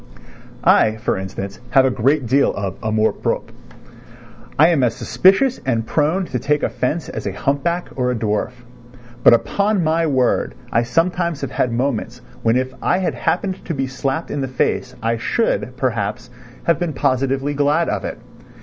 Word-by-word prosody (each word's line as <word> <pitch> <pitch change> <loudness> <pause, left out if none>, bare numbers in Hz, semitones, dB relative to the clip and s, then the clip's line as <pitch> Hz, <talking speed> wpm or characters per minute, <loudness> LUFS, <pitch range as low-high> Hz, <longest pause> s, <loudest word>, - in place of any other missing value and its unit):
I, 110 0 +4
for 110 - -1
instance, 95 +1 -6
have 130 +1 +5
a 130 - +2
great 135 +3 +1
deal 135 +4 +3
of 100 -2 -3
amour 110 0 +1
propre. - - -3 1.1
I 160 +4 +6
am 165 -5 +2
as 120 -2 +1
suspicious 235 +8 +3
and 115 -4 0
prone 160 +9 +1
to 125 -7 -3
take 150 +3 0
offence 150 +6 -1
as 110 - -5
a - - -1
humpback 155 - -1
or 125 -1 0
a 125 - 0
dwarf. 105 0 -1 0.7
But 120 - +8
upon 200 - 0
my 165 +1 +1
word 130 -4 +1 0.2
I 115 - +3
sometimes 165 +5 0
have 140 -2 -4
had 125 - 0
moments 125 0 -2 0.2
when 115 +1 +2
if 130 +1 -1
I - - +2
had 185 -1 -1
happened 190 0 -1
to 165 - -3
be 135 -1 -1
slapped 135 +4 -3
in 145 - -2
the 135 - -1
face 130 -1 -1
I 115 +1 +1
should, 125 - -1
perhaps, 120 -1 -2 0.3
have 170 -2 +2
been 175 -3 -2
positively 135 +2 0
glad 145 +4 +2
of - - -2
it. - - -4
135 Hz, 175 wpm, -20 LUFS, 115-160 Hz, 1.1 s, But